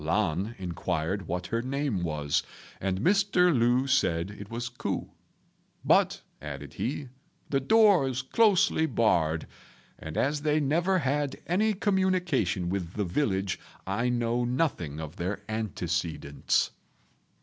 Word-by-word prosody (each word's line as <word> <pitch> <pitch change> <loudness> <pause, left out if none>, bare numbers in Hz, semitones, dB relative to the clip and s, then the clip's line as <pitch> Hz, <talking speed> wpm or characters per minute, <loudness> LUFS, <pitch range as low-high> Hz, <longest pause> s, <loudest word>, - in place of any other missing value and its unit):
Lan 95 +5 0
inquired 90 0 -2
what 90 +1 -3
her 115 +4 -1
name 135 -5 -1
was, 75 -4 0 0.4
and 95 0 -1
Mr. 180 - +4
Lu 120 +2 +3
said 95 -10 +1
it 105 -1 -10
was 120 +1 -4
Ku; 125 -1 -4 0.7
"But," - - +3 0.2
added - - -7
he, 135 +1 -3 0.4
"the 135 - +3
door 200 - +5
is 130 +1 -2
closely 185 - +3
barred, 85 - +1 0.5
and 80 0 -7
as 145 +2 +1
they 150 0 +2
never 170 +6 +2
had 145 -2 -1
any 210 +5 +2
communication 180 - +1
with 90 -1 -3
the 105 - -1
village, 95 -2 0 0.3
I 115 +6 0
know 120 0 0
nothing 120 - -1
of 80 +1 -7
their 95 +3 -3
antecedents." 90 -9 -1
120 Hz, 125 wpm, -28 LUFS, 90-150 Hz, 0.7 s, door